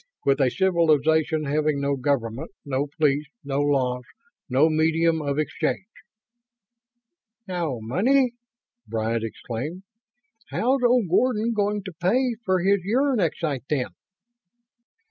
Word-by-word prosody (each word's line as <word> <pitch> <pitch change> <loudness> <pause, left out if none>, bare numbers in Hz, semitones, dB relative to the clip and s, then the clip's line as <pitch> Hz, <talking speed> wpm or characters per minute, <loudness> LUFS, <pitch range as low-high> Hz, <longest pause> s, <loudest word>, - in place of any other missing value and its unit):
"With 140 0 +3
a 130 - +4
civilization 160 -2 +2
having 150 0 0
no 140 0 0
government, 130 0 -1 0.2
no 140 +1 -1
police, 150 -1 +2 0.2
no 140 0 -2
laws, 130 -3 +1 0.5
no 135 +5 +4
medium 160 +1 +2
of 140 -1 -2
exchange 155 +4 -1 0.9
..." 235 0 -56
"No 170 -8 -2
money?" 240 - +2 0.6
Bryant 110 +1 -1
exclaimed. 125 - -5 0.6
"How's 260 +3 +1
old 245 -4 +3
Gordon 230 +4 +2
going 205 -1 0
to 190 - -7
pay 245 +7 +2
for 185 -3 +1
his 200 +1 +3
uranexite, 195 - 0
then?" 135 -4 0
160 Hz, 115 wpm, -24 LUFS, 140-205 Hz, 0.9 s, a